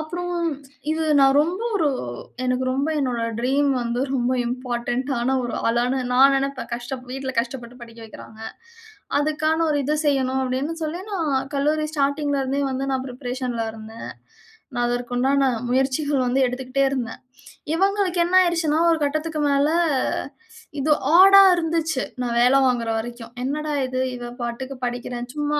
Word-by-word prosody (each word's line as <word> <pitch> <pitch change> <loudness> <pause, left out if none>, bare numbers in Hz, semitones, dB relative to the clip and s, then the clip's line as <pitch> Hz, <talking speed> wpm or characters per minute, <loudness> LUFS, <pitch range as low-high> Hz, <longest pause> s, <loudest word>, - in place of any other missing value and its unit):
அப்புறம் 355 +3 -4 0.6
இது 320 +1 -1 0.2
நான் 270 0 +5
ரொம்ப 350 +6 -3 0.2
ஒரு 320 -6 +2 0.6
எனக்கு 255 0 0
ரொம்ப 275 +3 0
என்னோட 250 -4 -1 0.2
ட்ரீம் 275 +3 +2
வந்து, 235 +1 -2
ரொம்ப 250 -1 +1
இம்போர்டன்ட் 245 0 -2
டான 255 +2 0
ஒரு 240 - -3
ஆளான 245 +3 +1
நான் 270 +2 +6
நெனைப்பேன். 270 -3 -3
கஷ்டப் 250 +2 -6
வீட்ல 270 0 -4
கஷ்டப்பட்டு 240 0 -8
படிக்க 230 -1 -12
வைக்கிறாங்க 220 0 -13 0.8
அதுக்கான 310 +2 0
ஒரு 295 - +1
இது 300 +3 +1
செய்யணும், 265 -2 +1
அப்பிடின்னு 260 +5 -2
சொல்லி, 320 +3 -4
நான் 295 -8 -1
கல்லூரி 300 +2 +1
ஸ்டார்ட்டிங்ல 285 -1 0
இருந்தே 270 +2 -1
வந்து 265 +1 -2
நான் 260 -1 -1
பிரிப்பரேஷன்ல 250 -2 -4
இருந்தேன் 220 +1 -9 0.7
நான் 240 -1 +1
அதற்கு 245 0 -3
உண்டான 275 +2 +2 0.2
முயற்சிகள் 270 +2 +1
வந்து 250 +2 +1
எடுத்துக்கிட்டே 255 +2 -2
இருந்தேன். 250 -4 -4 0.5
இவுங்களுக்கு 385 0 +1
என்ன 355 +2 +2
ஆயிருச்சுன்னா, 330 -3 +1
ஒரு 330 - +2
கட்டத்துக்கு 310 +2 -2
மேல 280 +1 +3 1.1
இது 295 +3 0 0.3
ஆடா 390 +1 +9
இருந்துச்சு. 325 -4 -1 0.2
நான் 240 -1 -2
வேல 250 +3 +5
வாங்குற 245 -2 0
வரைக்கும். 235 0 -7
என்னடா 300 +3 -2
இது? 255 0 -3 0.2
இவ 240 0 -7
பாட்டுக்கு 240 +3 -4
படிக்கிறேன் 245 0 -4
சும்மா 295 0 -1
265 Hz, 145 wpm, -23 LUFS, 245-300 Hz, 1.1 s, ஆடா